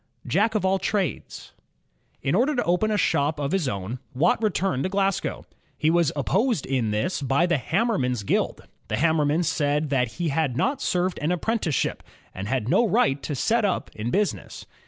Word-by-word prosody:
Jack 215 +5 +1
of 205 - +1
all 190 0 +2
trades 195 -4 -3 0.7
In 135 - 0
order 260 +10 +2
to 245 - +1
open 180 +5 +1
a 210 - +1
shop 150 -4 +1
of 140 0 -2
his 190 -7 0
own, 100 +4 -4 0.2
Watt 225 - +2
returned 195 - 0
to 185 - -1
Glasgow. 195 -1 -1 0.3
He 155 +1 +2
was 170 -3 +3
opposed 190 - +1
in 130 -5 0
this 105 - -1
by 140 +5 +2
the 170 -5 +1
hammermen's 150 - 0
^uild. - - 0 0.3
The 110 - -1
hammermen 155 +2 +2
said 145 -1 0
that 125 -4 +1
he 170 -2 -2
had 140 -4 0
not 270 - 0
served 180 0 0
an 155 +3 0
apprenticeship 180 - -1 0.3
and 95 +1 -5
had 125 -2 -1
no 190 - +4
right 140 -7 +2
to 145 - -4
set 225 - +1
up 195 -3 -1
in 110 +2 -3
business. 205 +8 -2
160 Hz, 180 wpm, -25 LUFS, 135-195 Hz, 0.7 s, no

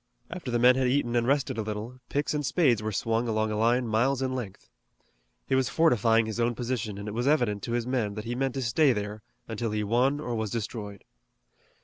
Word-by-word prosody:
After 170 -6 -6
the 120 - +1
men 125 +2 +5
had 130 -1 +2
eaten 125 -2 +1
and 120 0 +2
rested 140 -4 +1
a - - +1
little, 110 +4 -5
picks 145 +2 -1
and 150 -1 -1
spades 130 - +2
were 110 0 -2
swung 115 +3 0
along 110 -1 0
a - - -1
line 120 +3 +2
miles 125 +5 +1
in 130 0 -1
length. 120 -7 -6 0.8
He - - -2
was 130 -2 +2
fortifying 115 - +3
his 110 +1 -4
own 120 0 +1
position, 115 -4 -3
and 100 +1 -7
it 105 - -4
was 120 +4 -1
evident 120 -9 +2
to 115 - -3
his 120 -1 0
men 120 -5 -1
that 105 - -6
he 120 - -3
meant 135 +1 -1
to 135 - -2
stay 130 +4 +3
there 105 0 -4 0.3
until 115 0 -3
he 105 0 -1
won 125 +7 +2
or 125 -5 -4
was 110 -2 -2
destroyed. 105 -2 -5
120 Hz, 230 wpm, -27 LUFS, 110-130 Hz, 0.8 s, men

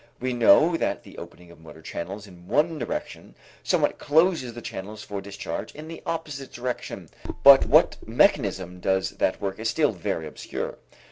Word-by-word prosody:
We 130 0 -2
know 135 - +5
that - - -2
the - - -12
opening 90 0 -12
of 85 - -16
motor 80 0 -14
channels 100 +7 -6
in 90 -3 -16
one 150 - +1
direction - - -5 0.3
somewhat - - +1
closes 155 -5 +2
the - - -6
channels 105 -1 -7
for 100 -1 -5
discharge 100 0 -6
in 155 +1 -9
the 165 0 -8
opposite 150 -5 -4
direction, 125 0 -5 0.4
but 140 -1 +9
what - - +5
mechanism 90 -1 +1
does 95 +1 0
that - - +1
work 100 0 -4
is 110 0 -1
still 150 +3 +2
very 85 -4 -3
obscure. 75 - -6
110 Hz, 165 wpm, -25 LUFS, 95-145 Hz, 0.4 s, but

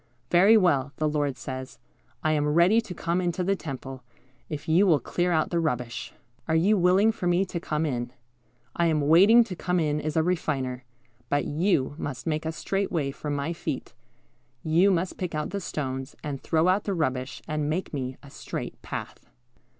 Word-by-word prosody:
"Very 195 +6 +7
well," 145 -8 +2
the 155 - 0
Lord 145 -3 -1
says, 130 +1 -7 0.5
"I 155 - +2
am 150 -1 +1
ready 170 +9 +4
to 200 -6 -8
come 170 +3 -1
into 175 0 -1
the 195 +2 +1
temple, 135 -5 -7 0.5
if 150 -2 -6
you 175 +5 +4
will 160 -5 +5
clear 175 +5 -1
out 160 -2 +1
the 170 - +1
rubbish. 125 -6 -2 0.4
Are 160 - +1
you 190 +7 +4
willing 190 +4 +4
for 190 -5 -4
Me 175 +2 +3
to 175 -2 -4
come 155 -1 -1
in? 120 -4 -2 0.6
I 170 - +2
am 155 -2 +2
waiting 190 +11 +7
to 205 -5 -7
come 180 +1 0
in 150 -2 0
as 155 +1 -2
a 160 - +4
Refiner; 135 -7 -2 0.4
but 145 0 +1
you 150 -3 +1
must 130 -3 -5
make 160 -1 -1
a - - -1
straight 195 +5 -2
way 145 -6 0
for 150 +2 -6
my 145 +3 -1
feet. - - -5 0.7
You 170 +5 +4
must 180 -1 -1
pick 180 -4 -3
out 150 - -2
the 200 - -3
stones, 135 -4 -4
and 140 -3 -4
throw 160 +1 +2
out 190 +3 +2
the 200 - -1
rubbish, 130 -5 -2
and 150 -1 -1
make 170 +3 -2
Me 130 -2 -4
a 140 - -13
straight - - -6
path." - - -7
160 Hz, 195 wpm, -26 LUFS, 145-180 Hz, 0.7 s, Very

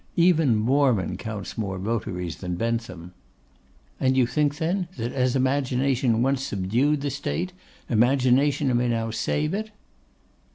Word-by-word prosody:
Even 165 -8 +4
Mormon 120 - +2
counts 110 -1 -6
more 95 -3 -2
votaries 90 -4 -3
than 90 -2 -4
Bentham.' 95 -5 -3 0.9
'And 130 0 +2
you 130 - +5
think, 145 +3 0
then, 175 +3 -1
that 120 +1 -3
as 130 -1 +1
Imagination 130 -2 +1
once 135 0 +1
subdued 125 +6 0
the 145 -1 -2
State, 170 +6 -3 0.3
Imagination 130 +3 +3
may 120 +1 +2
now 115 -1 -1
save 150 +7 -1
it? 215 +2 -3
125 Hz, 130 wpm, -25 LUFS, 115-140 Hz, 0.9 s, you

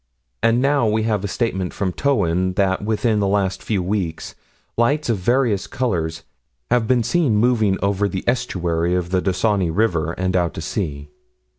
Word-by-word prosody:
And 120 +3 +3
now 140 -4 +2
we 110 +1 +1
have 105 -3 0
a - - -1
statement 95 -4 -2
from 95 -3 -1
Towyn 95 -9 +1
that 95 0 +1
within 110 0 +1
the 100 - +1
last 95 -1 0
few 100 -5 -1
weeks 90 -4 -3 0.4
lights 140 +5 +1
of 110 -4 +1
various 120 -1 +1
colors 90 -12 -2 0.5
have 120 -2 +2
been 125 -1 +3
seen 150 -3 +1
moving 110 -3 +2
over 100 0 +1
the 95 -1 -4
estuary 90 -8 0
of 90 -1 -2
the 95 -1 +2
Dysynni 95 -1 +1
River, 85 -4 0
and 95 +1 -1
out 85 -2 0
to - - -5
sea. 70 0 -4
100 Hz, 170 wpm, -21 LUFS, 90-115 Hz, 0.5 s, And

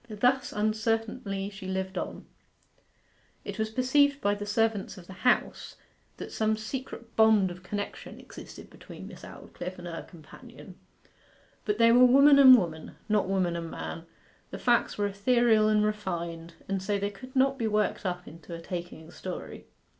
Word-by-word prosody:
Thus 250 +5 +1
uncertainly 215 -1 -2
she 195 -1 -9
lived 190 0 -3
on. - - -5 1.2
It - - -6
was 220 0 0
perceived 275 +4 +2
by 205 -6 +1
the 205 0 -5
servants 220 -2 0
of 180 - -12
the 190 - -11 0.2
House - - -1 0.4
that - - -8
some 220 0 0
secret 235 0 -7
bond 220 -4 +4
of 180 +1 -10
connection 205 +2 -6
existed - - -12
between - - -11
Miss - - -12
Aldclyffe 180 +1 -8
and 175 - -10
her 165 -1 -5
companion. 165 -4 -14 0.9
But 210 -1 0
they 230 0 +5
were 250 +2 +7
woman 280 +3 +7
and 260 -2 +10
woman, 160 -6 -4
not 210 -3 +1
woman 185 -3 0
and 165 -1 -5
man, 165 0 -7 0.4
the - - -7
facts 240 -1 +1
were 205 - 0
ethereal 215 +2 +3
and 210 0 +3
refined, 170 -5 -4
and 195 -1 -2
so 200 +2 -1
they 200 +1 -2
could 255 +7 -13
not 270 +1 +2
be 225 - 0
worked 210 0 0
up 180 -2 -4
into 165 +1 -10
a - - -8
taking 170 -2 -7
story. 185 0 -8
205 Hz, 165 wpm, -28 LUFS, 185-230 Hz, 1.2 s, and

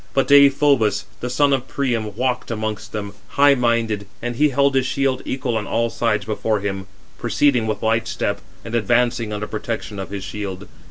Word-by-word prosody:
But 135 - +2
Deïphobus, 140 -7 +5 0.2
the 125 - -4
son 140 +3 +3
of 130 -2 -1
Priam, 115 -7 -2
walked 125 +1 -1
amongst 110 -2 -4
them, 100 -1 -5 0.2
high 140 0 +7
minded, 115 -5 0
and 120 0 -4
he 150 +4 +3
held 140 +1 +2
his 130 -1 +2
shield 135 -1 0
equal 130 -3 -2
on 105 - -3
all 115 0 0
sides 115 -3 0
before 110 0 -1
him, 95 -1 -4 0.3
proceeding 125 -6 +2
with 110 0 -3
light 115 0 +1
step, 100 0 -2 0.2
and 115 - -7
advancing 120 0 +1
under 105 0 -3
protection 105 -1 -5
of 95 - -5
his 100 -1 -5
shield. 100 -1 -6
115 Hz, 180 wpm, -21 LUFS, 105-130 Hz, 0.3 s, high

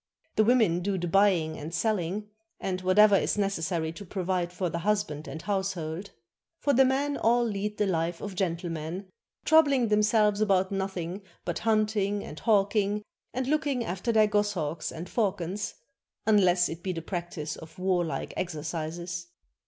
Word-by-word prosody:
The 215 - +5
women 220 -7 +4
do 190 +2 -1
the 175 -1 -2
buying 180 -4 +3
and 150 +2 -6
selling, 210 +1 -1 0.3
and 185 -1 -2
whatever 200 +3 +6
is 195 - +1
necessary 175 -5 -1
to 185 +5 -9
provide 180 -2 -2
for 180 0 -2
the 170 0 -3
husband 175 -6 -1
and 160 - -6
household; 190 -1 -3 0.5
for 285 - +1
the 265 - +6
men 275 +2 +1
all 240 +2 +3
lead 210 -2 -2
the 210 - +2
life 170 -2 -1
of 205 - -5
gentlemen, 175 0 -3 0.3
troubfing 285 -7 +5
themselves 210 0 +3
about 190 -2 +2
nothing 190 -1 -3 0.2
but 175 - -2
hunting 215 -2 +1
and 150 - -8
hawking 205 -1 +2 0.3
and 255 +1 -2
looking 285 -3 0
after 190 +6 -2
their 220 -1 +5
goshawks 200 -7 -1
and 170 +2 -7
falcons, 195 -2 -1 0.5
unless 185 -5 +4
it 165 +1 -6
be 185 0 -2
the 165 -2 -5
practice 170 -4 -4
of 160 - -12
warHke 180 -3 -1
exercises. 170 +1 -4
190 Hz, 155 wpm, -28 LUFS, 170-210 Hz, 0.5 s, whatever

